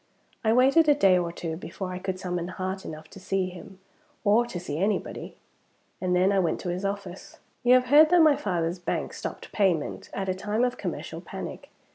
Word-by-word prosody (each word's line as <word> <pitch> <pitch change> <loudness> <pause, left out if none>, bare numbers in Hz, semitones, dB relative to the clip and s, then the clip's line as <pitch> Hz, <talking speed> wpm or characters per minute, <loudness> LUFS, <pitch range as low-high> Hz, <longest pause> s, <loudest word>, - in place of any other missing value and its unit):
I 220 - +3
waited 275 +6 +5
a 295 - +6
day 190 -9 +5
or 170 -1 -2
two 165 -1 -5
before 185 +2 -6
I 180 - -5
could 185 0 -4
summon 180 -2 -3
heart 185 +1 -4
enough 155 0 -8
to - - -11
see 190 0 -1
him, 185 +2 -11 0.5
or 225 +3 +4
to 190 -7 -5
see 155 -3 -4
anybody; 205 +3 -2 0.7
and 180 -1 +1
then 185 +2 +4
I 200 - +3
went 170 -4 0
to 180 - -4
his 180 +2 -3
office. 195 -2 -5 0.2
You 245 +1 +6
have 255 0 +4
heard 310 +1 +8
that 350 -1 +6
my 305 -2 +6
father's 175 -4 -2
bank 175 - -3
stopped - - -7
payment, 185 -7 0
at 195 -1 -4
a 185 - +1
time 210 +5 -1
of 250 0 -1
commercial - - -5
panic. - - -8
190 Hz, 205 wpm, -26 LUFS, 180-220 Hz, 0.7 s, heard